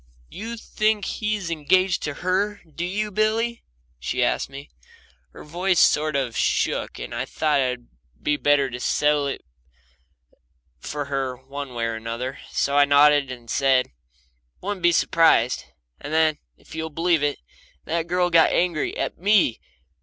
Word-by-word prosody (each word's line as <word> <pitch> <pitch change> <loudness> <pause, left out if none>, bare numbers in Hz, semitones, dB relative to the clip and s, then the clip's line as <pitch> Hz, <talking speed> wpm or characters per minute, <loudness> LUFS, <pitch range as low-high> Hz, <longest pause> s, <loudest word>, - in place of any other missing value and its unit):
"You 230 +3 -6
think 215 -2 0
he 215 -1 -1
IS 190 -5 -5
engaged 175 +4 +2
to 145 -1 -4
her, 200 +3 0
do 160 +2 -6
you, 210 +4 -2
Billy?" 220 +3 0 0.4
she 60 - -1
asked - - 0
me. 140 +1 -10 0.6
Her - - -12
voice 175 +3 0
sort 155 0 +3
of 130 -4 -1
shook, - - 0
and - - -7
I 120 +2 -2
thought 150 0 +1
I'd 125 -2 -2 0.6
better 140 -4 +2
settle 145 +2 +1
it 140 - -5 1.3
for 145 - -4
her 135 -2 -3
one 135 0 -8
way 115 -1 -1
or 115 -1 -3
the 115 - -6
other, 125 +3 -4
so 140 - 0
I 145 - +7
nodded 145 -1 +5
and 120 -2 -10
said, 130 +1 +2 0.7
"Wouldn't 200 0 -4
be 175 0 +5
surprised," 160 - +3 0.3
and 145 - -7
then, 155 -1 +2 0.2
if - - -16
you'll 160 0 -4
believe 165 0 +1
it, 145 -1 0 0.5
that 165 +1 -2
girl 180 0 +1
got 165 -1 +6
angry 170 -4 0
at - - -3
ME. 195 - +3
150 Hz, 155 wpm, -23 LUFS, 135-180 Hz, 1.3 s, I